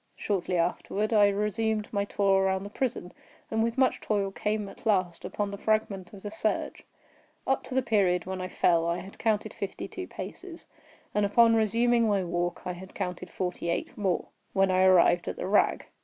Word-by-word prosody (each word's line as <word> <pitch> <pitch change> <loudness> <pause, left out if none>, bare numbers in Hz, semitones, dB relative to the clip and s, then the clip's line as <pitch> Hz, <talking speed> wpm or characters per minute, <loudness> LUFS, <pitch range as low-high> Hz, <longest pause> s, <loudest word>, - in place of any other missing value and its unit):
Shortly 185 -3 -1
afterward, 195 +5 -1
I 205 -2 +6
resumed 210 +1 0
my 200 -1 +1
tour 195 -1 +2
around 190 0 +1
the 205 - -8
prison, 220 -8 -3 0.4
and 220 - +1
with 230 +2 0
much 260 -1 +2
toil 200 -2 0
came 210 +1 -2
at 195 - -13
last 185 -5 +1
upon 205 -1 -3
the 200 - -7
fragment 210 -4 0
of 195 -2 -12
the 205 - -5
serge. 220 0 -2 0.6
Up 270 - +1
to 260 - -6
the 260 - +2
period 190 -7 +2
when 185 0 -4
I 185 - -3
fell 170 -2 +2
I 170 +1 0
had 195 +2 -10
counted 215 -2 0
fifty - - -5
two - - -7
paces, 360 -3 -8 0.5
and 210 - +2
upon 230 +3 +5
resuming 230 +2 +3
my 200 -3 +2
walk, 175 0 -2
I 180 - -2
had 185 +2 -11
counted 180 0 -4
forty 180 -1 -3
eight 170 - -2
more—when 195 0 -1
I 185 0 +3
arrived 175 -2 +5
at - - -2
the - - -5
rag. 200 +2 +2
200 Hz, 190 wpm, -28 LUFS, 185-215 Hz, 0.6 s, I